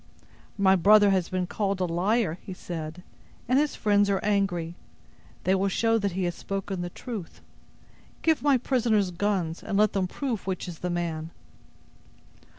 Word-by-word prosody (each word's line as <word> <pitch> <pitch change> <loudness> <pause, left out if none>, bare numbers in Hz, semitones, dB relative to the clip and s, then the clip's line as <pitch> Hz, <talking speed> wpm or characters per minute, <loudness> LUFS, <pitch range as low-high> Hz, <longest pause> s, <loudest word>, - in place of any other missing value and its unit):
"My 190 -1 +5
brother 205 +2 +6
has 185 -3 +1
been 185 -1 -1
called 195 +1 -2
a 185 - +1
liar," 180 +1 0
he 190 - -7
said, 165 -1 -6 0.4
"and 255 +3 +4
his 295 0 0
friends 205 -1 +3
are 195 -1 +2
angry. 195 -5 0 0.7
They 185 - +2
will 195 +1 +2
show 225 +3 +2
that 200 -3 -1
he 185 +1 -1
has 175 -1 0
spoken 195 0 -4
the 175 - -3
truth. 205 -2 -7 0.8
Give 320 -1 +3
my 280 -2 +4
prisoners 225 -6 +1
guns, 180 -3 -1
and 200 - -2
let 210 0 +4
them 190 -2 0
prove 235 -1 -4
which 185 -2 -3
is 170 -3 -7
the 180 - -3
man." 165 -2 -3
195 Hz, 165 wpm, -27 LUFS, 175-210 Hz, 0.8 s, brother